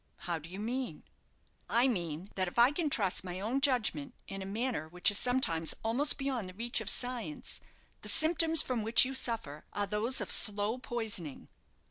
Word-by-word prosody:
"How 170 -3 -1
do 155 +2 -12
you 190 +2 -8
mean?" 245 +4 -4 0.7
"I 240 +3 +5
mean 175 - -3
that 185 -1 -1
if 175 - -8
I 240 +3 +6
can 305 0 -1
trust 200 -10 +1
my 180 0 -5
own 235 +7 -1
judgment 270 0 +1
in 195 0 -6
a 190 - -6
matter 220 - -2
which 180 +4 +3
is 205 - +2
sometimes 205 -11 0
almost 245 +7 +2
beyond 260 -8 -3
the 185 - -12
reach 235 +3 -1
of - - -1
science, 250 +2 -3 0.4
the - - -2
symptoms 325 0 +4
from 250 -3 -2
which 225 +4 +5
you 265 - -4
suffer 225 - -2
are 205 - -1
those 210 +5 +1
of - - -1
slow 210 +3 +2
poisoning." 220 - -5
230 Hz, 185 wpm, -32 LUFS, 190-255 Hz, 0.7 s, I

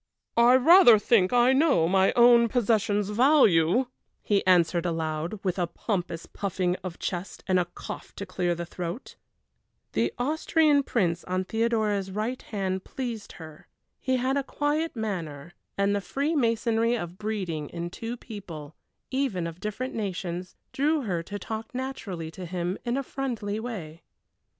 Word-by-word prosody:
"I 240 +2 +7
rather 260 - +8
think 205 -3 +3
I 245 +1 +5
know 265 - +3
my 190 +2 +3
own 235 -1 +7
possession's 215 -3 +1
value!" 230 - +4 0.4
he 200 -2 +2
answered 175 -1 +4
aloud, 165 +2 -2
with 185 -1 -1
a 175 - +1
pompous 175 -2 -3
puffing 185 -2 -2
out - - -29
of 175 -2 -5
chest, 180 +1 -5
and 185 -1 +2
a 180 - +1
cough 175 - -9
to 200 - -5
clear 180 -2 -1
the 170 0 -5
throat. 175 +6 -6 0.8
The - - 0
Austrian 300 +2 +2
Prince 175 -10 0
on 185 +1 -1
Theodora's 220 -3 0
right 215 +6 -3
hand 190 -3 -3
pleased 235 -5 -6
her. 155 -2 -12 0.3
He 260 -1 0
had 260 +2 0
a 280 - 0
quiet 295 +3 -1
manner, 175 -8 -4 0.2
and 200 0 +2
the 200 - -1
freemasonry 235 - +1
of 175 -2 -7
breeding 185 -9 -3
in 170 0 -5
two 230 +5 -5
people, 170 -11 -9 0.4
even 260 -10 -1
of 165 +1 -6
different 215 +6 -4
nations, 180 -3 -4 0.2
drew 300 +3 +1
her 180 -7 -1
to 205 +5 -6
talk 220 +4 -6
naturally 200 -11 -5
to 180 +1 -8
him 180 +1 -2
in 240 +2 0
a 275 - -1
friendly 235 -7 -3
way. 175 -9 -6
205 Hz, 155 wpm, -27 LUFS, 175-245 Hz, 0.8 s, rather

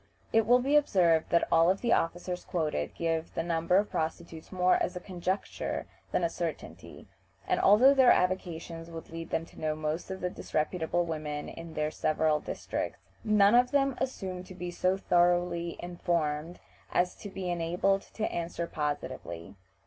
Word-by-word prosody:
It 225 -1 +4
will 245 +1 +7
be 270 +4 +1
observed 175 - +3
that 170 - +3
all 165 +2 +5
the 235 +4 +1
officers 175 +2 -1
quoted 155 - -2
give 165 -1 -2
the 165 - 0
number 170 +1 +2
of 205 +1 +1
prostitutes 165 0 -4
more 180 -1 +3
as 180 - -1
a - - -3
conjecture 185 +1 -3 0.3
than - - +1
a - - +4
certainty; 170 -3 -6 0.4
and - - +1
although 240 +8 +7
their 260 -3 +6
avocations 170 -2 0
would 165 -1 -9
lead 165 0 -6
them 165 - -1
to - - -15
know 155 -1 0
most 155 +3 -3
of 190 0 -5
the 180 - -1
disreputable 170 +2 -1
women 150 -2 -4
in 165 -1 -9
their 150 0 0
several 155 -1 +1
districts, - - -4 0.3
none 210 -1 +5
of 245 +1 +5
them 275 -1 +2
assume 185 -8 -3
to 185 - -11
be 180 -1 -5
so 185 +2 +1
thoroughly 175 -2 +2
informed 170 -2 -2 0.3
as 180 0 +2
to 205 - -8
be 190 -2 -4
enabled 175 +3 +1
to 220 - -8
answer 170 0 -3
positively. 100 - -4
175 Hz, 165 wpm, -30 LUFS, 165-190 Hz, 0.4 s, will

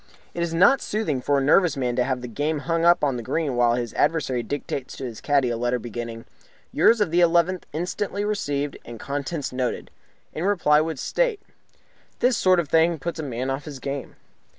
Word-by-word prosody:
It 170 - -4
is 170 -1 -1
not 200 +11 +5
soothing 200 -12 -2
for 145 +2 +1
a 135 - +1
nervous 160 +3 +4
man 125 -2 -1
to 125 - +2
have 130 -1 -2
the 125 - -6
game 145 +6 -2
hung 165 0 -1
up 175 -2 +5
on 135 -4 +1
the - - -4
green 140 +3 -2
while 120 -1 +3
his 120 -2 -3
adversary 135 -7 +1
dictates 140 0 -5
to - - -7
his 115 -3 -7
caddy 140 -4 +2
a 115 - -2
letter 120 +1 0
beginning 115 -1 -6 0.5
"Yours 230 -1 +4
of 180 - +1
the 175 - +3
11th 175 +1 +3
inst. 175 +6 -4
received 170 -9 -2
and 115 -1 -10
contents 140 +2 -4
noted. 125 -1 -3 0.4
In 160 - -4
reply 175 -7 +3
would 160 -1 -3
state - - 0 0.4
" - - -36
This 250 0 +3
sort 185 -3 +4
of 170 - -1
thing 165 +2 +3
puts 170 +3 -5
a - - -3
man 130 -1 -3
off 135 +2 -4
his 145 -3 -7
game. 135 +1 -5
145 Hz, 210 wpm, -24 LUFS, 125-170 Hz, 0.5 s, not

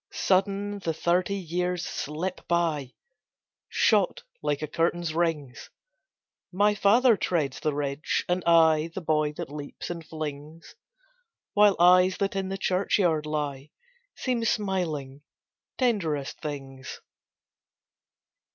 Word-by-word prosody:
Sudden, 200 +2 0
the 165 -4 -2
thirty 180 +4 +1
years 180 -1 -2
slip 165 +6 -4
by, 165 -6 0 0.7
Shot 205 -5 +2 0.2
like 150 0 -1
a - - -2
curtain's 165 +1 -1
rings! 160 -6 -2 0.8
My 205 +3 +3
father 225 +4 +4
treads 155 -8 -1
the 150 -2 -1
ridge, 145 +1 -2
and 180 +1 0
I 160 -1 +5
The 190 - -3
boy 155 -2 +1
that 145 - -7
leaps 145 +3 -7
and 170 -1 -6
flings, 155 0 -7 0.8
While 205 -1 +5
eyes 180 +1 +5
that 200 -1 -1
in 190 -1 -2
the 195 - -3
churchyard 180 -4 +1
lie 145 -2 -3 0.5
Seem 250 -3 -1
smiling 170 -11 -2 0.6
tenderest 170 - -1
things. 135 -3 -7
170 Hz, 115 wpm, -27 LUFS, 150-190 Hz, 0.8 s, I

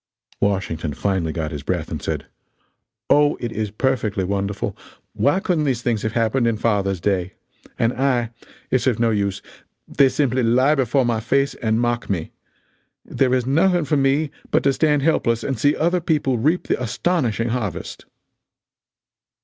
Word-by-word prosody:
Washington 85 -7 -1
finally 95 -3 -1
got 80 -1 -3
his 75 -2 -5
breath - - -3
and - - -4
said: - - -3 0.8
"Oh, 145 0 +4
it 120 -2 -4
is 110 -1 -2
perfectly 110 -3 -1
wonderful! 100 +1 -2 0.4
Why 145 +7 +2
couldn't 175 -6 0
these 125 -4 -1
things 115 -3 0
have 110 -1 -2
happened 115 +1 +1
in 115 -2 0
father's 100 -4 0
day? 95 0 -1 0.4
And 115 +1 +1
I 125 -4 0 0.4
it's 130 0 +1
of 120 -4 +1
no 115 -1 +2
use 100 -2 -1 0.4
they 135 -1 +4
simply 130 -2 0
lie 125 +5 +3
before 135 -2 +1
my 115 -2 0
face 135 +5 +1
and 110 0 -1
mock 120 0 -1
me. 85 -5 -2 0.7
There 130 -1 +1
is 125 -2 0
nothing 170 +5 +2
for 150 - +1
me 140 +2 +1 0.2
but - - +2
to 140 - +3
stand 150 -1 +2
helpless 115 -7 +1
and 135 -5 -2
see 145 +4 +3
other 175 +3 +1
people 145 -7 0
reap 155 +9 +1
the - - 0
astonishing 120 - 0
harvest." 115 -5 -4
120 Hz, 165 wpm, -21 LUFS, 105-140 Hz, 0.8 s, Oh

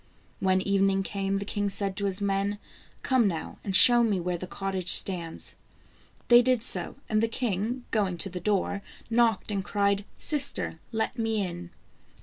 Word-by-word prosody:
When 185 -1 +2
evening 195 0 +1
came, 195 0 -2
the 200 - -4
king 205 0 -2
said 195 0 -2
to 200 - -2
his 195 0 -1
men: 200 +1 -1 0.2
" - - -29
Come 255 -5 +2
now, 165 -4 -5
and 195 -2 -1
show 240 +4 +8
me 215 -5 +1
where 180 0 -2
the 185 - -6
cottage 190 -1 -3
stands." 170 -4 +2 0.7
They 240 0 +7
did 250 -2 +1
so, - - 0
and 215 0 +1
the 225 - +2
king 230 +1 -3
going 195 -5 0
to 195 - -4
the 180 - -5
door, 200 +1 -1 0.3
knocked 225 -3 +1
and 195 -2 -2
cried, 200 0 0
" - - -34
Sister, 295 -2 0
let 220 0 -3
me 220 -3 0
in." 175 -1 -7
200 Hz, 180 wpm, -27 LUFS, 190-220 Hz, 0.7 s, show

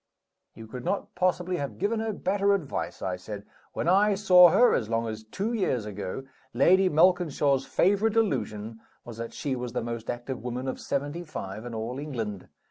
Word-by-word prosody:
"You 115 - -10
could 125 +3 -8
not 200 - -2
possibly 180 0 0
have 140 -3 -4
given 210 +4 0
her 220 0 -1
better 200 0 +1
advice," 160 -9 -4
I 90 -1 -2
said. 100 +2 -8 0.3
"When - - -2
I 200 +3 +4
saw 180 -3 +7
her, 245 +9 +5
as 110 -3 0
long 115 0 0
as 110 0 -5
two 195 - -3
years 155 - 0
ago, 105 +4 -5 0.3
Lady 185 +9 +5
Malkinshaw's 155 -5 +3
favorite 205 +4 +2
delusion 115 - -1 0.3
was 120 -2 -9
that 115 0 -5
she 140 -3 -3
was 125 -1 -5
the 125 - -2
most 115 -1 -5
active 120 +2 -4
woman 125 +1 -4
of 130 - -3
seventy 145 +5 -3
five 110 - -7
in 120 - -6
all 115 +4 -4
England. 115 -10 -5
135 Hz, 185 wpm, -27 LUFS, 115-185 Hz, 0.3 s, saw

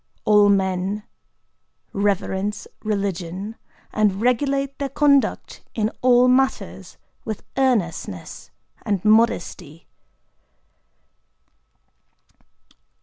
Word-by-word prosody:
All 210 -1 +5
men 190 +1 0 0.9
reverence 200 0 -1 0.2
religion, 200 -1 -3 0.4
and 210 -3 +2
regulate 275 +3 0
their 280 -1 -2
conduct 280 0 +1
in 215 0 0
all 250 0 +5
matters 260 +1 0 0.3
with 220 -3 -5
earnestness 195 - -1 0.3
and 200 -1 -2
modesty." 180 -7 +1
210 Hz, 70 wpm, -22 LUFS, 190-250 Hz, 0.9 s, All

